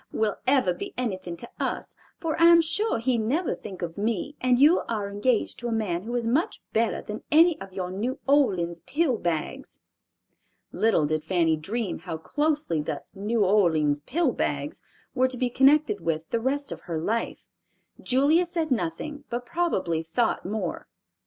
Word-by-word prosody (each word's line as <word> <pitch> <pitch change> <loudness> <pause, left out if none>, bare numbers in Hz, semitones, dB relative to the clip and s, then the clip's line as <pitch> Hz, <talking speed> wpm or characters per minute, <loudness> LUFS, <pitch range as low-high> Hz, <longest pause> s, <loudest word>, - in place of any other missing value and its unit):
—will 215 -2 0
ever 255 -9 +3
be 175 - -7
anything 185 -8 -3
to 235 - -6
us, - - -3 0.3
for 325 -4 -1
I - - +8
am 340 0 +8
sure 340 - +1
he'd 240 +1 +1
never 275 +11 0
think 190 -3 -8
of 165 +2 -5
me, 225 +6 -1
and 250 -1 +3
you 300 +7 +6
are 215 -3 -1
engaged 215 +3 0
to 240 - -4
a - - -2
man 205 -6 -1
who 235 +5 -5
is 240 -1 -1
much 300 - 0
better 230 +1 +1
than 210 +1 -6
any 325 +1 +5
of 195 - -8
your 185 -1 -4
New 235 +8 -2
Orleans 185 - +2
pill 290 -5 +1
bags." 170 - -3 0.9
Little 215 -8 +2
did 155 +1 -1
Fanny 165 -1 +2
dream 200 +7 -3
how 165 -1 -5
closely 295 - 0
the 150 - -4
"New 210 +2 0
Orleans 160 -7 +3
pill 295 - 0
bags" 145 -8 -3 0.3
were 260 -1 +3
to 255 -1 -4
be 245 0 0
connected 300 - +4
with 160 -1 -2
the 230 - +1
rest 280 +4 -1
of - - -6
her 165 -2 -1
life. 220 +8 -2 0.6
Julia 290 +7 +3
said 335 -3 -2
nothing 270 - -2
but 245 +1 -3
probably 190 - 0
thought 170 +9 0
more. 195 -2 -4
230 Hz, 175 wpm, -26 LUFS, 180-280 Hz, 0.9 s, I